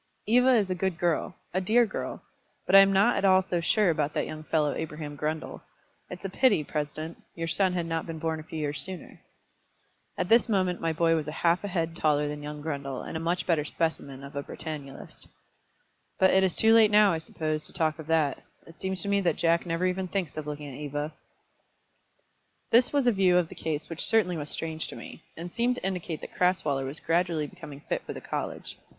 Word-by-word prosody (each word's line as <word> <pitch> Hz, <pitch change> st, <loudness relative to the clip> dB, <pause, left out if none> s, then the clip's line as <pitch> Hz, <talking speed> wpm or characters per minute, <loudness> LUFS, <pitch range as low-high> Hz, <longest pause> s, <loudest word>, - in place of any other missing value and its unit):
"Eva 250 Hz, +4 st, +5 dB
is 200 Hz, -5 st, +2 dB
a -, -, +3 dB
good 185 Hz, -1 st, -1 dB
girl, 175 Hz, -1 st, 0 dB, 0.2 s
a 185 Hz, -, +1 dB
dear 230 Hz, +6 st, +4 dB
girl. -, -, -5 dB, 0.4 s
But -, -, -2 dB
I -, -, +12 dB
am 195 Hz, 0 st, +6 dB
not 200 Hz, +5 st, +4 dB
at -, -, -1 dB
all 190 Hz, -1 st, +5 dB
so 175 Hz, -2 st, -1 dB
sure 200 Hz, +2 st, +3 dB
about 150 Hz, -2 st, -1 dB
that -, -, 0 dB
young 155 Hz, -, -7 dB
fellow 155 Hz, -2 st, +1 dB
Abraham 150 Hz, -2 st, -5 dB
Grundle. 155 Hz, +2 st, -4 dB, 0.5 s
It's 180 Hz, +1 st, -8 dB
a -, -, -2 dB
pity, 215 Hz, -, +3 dB
President, 155 Hz, +2 st, -5 dB
your 165 Hz, -1 st, -3 dB
son 185 Hz, +3 st, +2 dB
had 175 Hz, -2 st, -1 dB
not 165 Hz, 0 st, -3 dB
been 165 Hz, -1 st, -5 dB
born 160 Hz, 0 st, -2 dB
a -, -, -8 dB
few 160 Hz, -, -8 dB
years 145 Hz, -2 st, -2 dB
sooner." 185 Hz, +1 st, -7 dB, 1.0 s
At 180 Hz, -, -1 dB
this 230 Hz, +4 st, +4 dB
moment 185 Hz, -4 st, +1 dB
my 165 Hz, -, +1 dB
boy 165 Hz, +1 st, +2 dB
was 155 Hz, -2 st, -1 dB
half 170 Hz, +4 st, +1 dB
a -, -, -2 dB
head 165 Hz, -3 st, -2 dB
taller 150 Hz, -3 st, +2 dB
than 150 Hz, 0 st, -5 dB
young 150 Hz, 0 st, -7 dB
Grundle, 140 Hz, -4 st, -4 dB
and -, -, -6 dB
a -, -, -1 dB
much 170 Hz, +2 st, -1 dB
better 160 Hz, -4 st, +2 dB
specimen 145 Hz, -4 st, -3 dB
of 140 Hz, 0 st, -10 dB
a 140 Hz, -, -1 dB
Britannulist. 145 Hz, -2 st, -8 dB, 0.9 s
"But 190 Hz, -, +5 dB
it 190 Hz, -, +4 dB
is 185 Hz, -2 st, +1 dB
too 225 Hz, 0 st, +5 dB
late 225 Hz, -2 st, +7 dB
now, 210 Hz, -2 st, +5 dB
I 160 Hz, -, -1 dB
suppose, 155 Hz, -1 st, -3 dB
to -, -, -5 dB
talk 160 Hz, -2 st, -1 dB
of 160 Hz, -, -8 dB
that. 160 Hz, -4 st, +1 dB, 0.2 s
It 165 Hz, -, -16 dB
seems 190 Hz, -2 st, 0 dB
to -, -, -4 dB
me 200 Hz, 0 st, +2 dB
that 180 Hz, -, +1 dB
Jack 170 Hz, +1 st, +1 dB
never 165 Hz, +2 st, 0 dB
even 185 Hz, 0 st, -1 dB
thinks 180 Hz, -5 st, -3 dB
of 155 Hz, -1 st, -5 dB
looking 150 Hz, 0 st, -5 dB
at -, -, -9 dB
Eva." 145 Hz, +1 st, -4 dB, 1.6 s
This 240 Hz, +2 st, +5 dB
was 285 Hz, -3 st, +1 dB
a 245 Hz, -, +5 dB
view 190 Hz, -4 st, +3 dB
of 175 Hz, -2 st, +1 dB
the -, -, -9 dB
case 155 Hz, -1 st, -3 dB
which 165 Hz, -1 st, -6 dB
certainly 215 Hz, -6 st, +3 dB
was 150 Hz, -2 st, -4 dB
strange 160 Hz, -1 st, -3 dB
to -, -, -8 dB
me, -, -, -10 dB, 0.2 s
and 175 Hz, +2 st, -6 dB
seemed 240 Hz, +4 st, +1 dB
to 250 Hz, -, -6 dB
indicate 180 Hz, -4 st, -3 dB
that -, -, -9 dB
Crasweller 155 Hz, -7 st, +1 dB
was 140 Hz, +4 st, -3 dB
gradually 165 Hz, -2 st, 0 dB
becoming 150 Hz, -4 st, -10 dB
fit -, -, -3 dB
for -, -, -6 dB
the -, -, -7 dB
college. -, -, -5 dB
165 Hz, 225 wpm, -28 LUFS, 155-190 Hz, 1.6 s, I